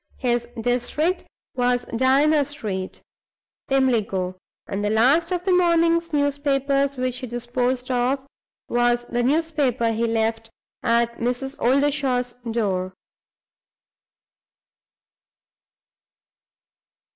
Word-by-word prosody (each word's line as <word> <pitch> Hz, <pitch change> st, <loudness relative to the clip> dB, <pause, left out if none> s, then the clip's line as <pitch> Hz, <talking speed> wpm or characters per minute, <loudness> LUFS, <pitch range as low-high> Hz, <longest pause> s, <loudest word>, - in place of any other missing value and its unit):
His 240 Hz, -2 st, 0 dB
district 250 Hz, +9 st, 0 dB, 0.3 s
was 245 Hz, 0 st, +1 dB
Diana 280 Hz, +5 st, +4 dB
Street, 215 Hz, -10 st, -5 dB, 0.7 s
Pimlico; 220 Hz, -9 st, +1 dB, 0.3 s
and 195 Hz, +1 st, -4 dB
the 205 Hz, -, +1 dB
last 270 Hz, -, +3 dB
of 360 Hz, -1 st, -1 dB
the 375 Hz, 0 st, +2 dB
morning's 335 Hz, -1 st, +3 dB
newspapers 280 Hz, -1 st, +1 dB
which 255 Hz, -1 st, -1 dB
he 255 Hz, -, -6 dB
disposed 245 Hz, +2 st, -2 dB
of 255 Hz, +2 st, 0 dB, 0.4 s
was 240 Hz, 0 st, +1 dB
the 240 Hz, 0 st, -1 dB
newspaper 275 Hz, -4 st, +1 dB
he 230 Hz, +1 st, 0 dB
left 225 Hz, 0 st, -1 dB, 0.3 s
at 235 Hz, 0 st, +1 dB
Mrs. 250 Hz, +3 st, -1 dB
Oldershaw's 265 Hz, -2 st, +1 dB, 0.2 s
door. 190 Hz, -5 st, -1 dB
250 Hz, 90 wpm, -23 LUFS, 235-285 Hz, 0.7 s, Diana